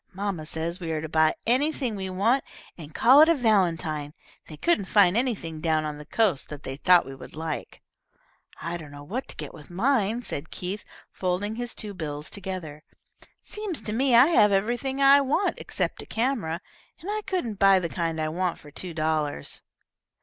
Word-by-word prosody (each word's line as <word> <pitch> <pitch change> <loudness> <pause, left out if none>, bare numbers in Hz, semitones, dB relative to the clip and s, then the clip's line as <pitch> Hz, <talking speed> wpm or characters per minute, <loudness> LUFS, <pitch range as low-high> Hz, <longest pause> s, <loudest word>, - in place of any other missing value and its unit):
"Mamma 190 -6 -3
says 165 +3 -3
we 165 -3 -4
are 155 - -2
to 160 - -4
buy 160 0 +3
anything 255 -1 +1
we 190 -1 -4
want, 220 +9 +2 0.3
and 155 -3 -10
call 260 +5 +7
it 315 - +7
a 335 - +5
valentine. 165 - +1 0.3
They 155 - -10
couldn't 225 - +1
find 195 -2 +4
anything 200 -11 -1
down 155 -2 +1
on 150 -1 -5
the 150 - -11
coast 200 - +1
that 150 -1 -8
they 135 - -5
thought 180 +4 +5
we 135 - -8
would 135 - -11
like." 160 -1 -5 0.8
"I 170 +1 -3
don't 155 -3 -10
know 145 0 -10
what 235 - -4
to - - -9
get - - -7
with 150 -3 -13
mine," 225 +3 +1
said 160 -7 -4
Keith, 190 +3 -5 0.3
folding 185 +3 -2
his 240 0 -5
two 210 -2 -5
bills 150 -4 -5
together. 185 -7 -6 0.6
"Seems 420 -6 -4
to 210 - -3
me 255 +1 +3
I 240 +3 +9
have 210 -11 +5
everything 240 +7 0
I 275 +1 +7
want 285 +8 0
except - - -3
a - - -12
camera, 225 -9 -1 0.4
and 350 - -11
I 430 0 -1
couldn't 240 - -2
buy 195 -1 +6
the 180 -2 0
kind 165 -1 -2
I 155 0 0
want 175 +2 -1
for 150 - -14
two 170 +2 -6
dollars." 155 - -1
185 Hz, 195 wpm, -26 LUFS, 160-235 Hz, 0.8 s, I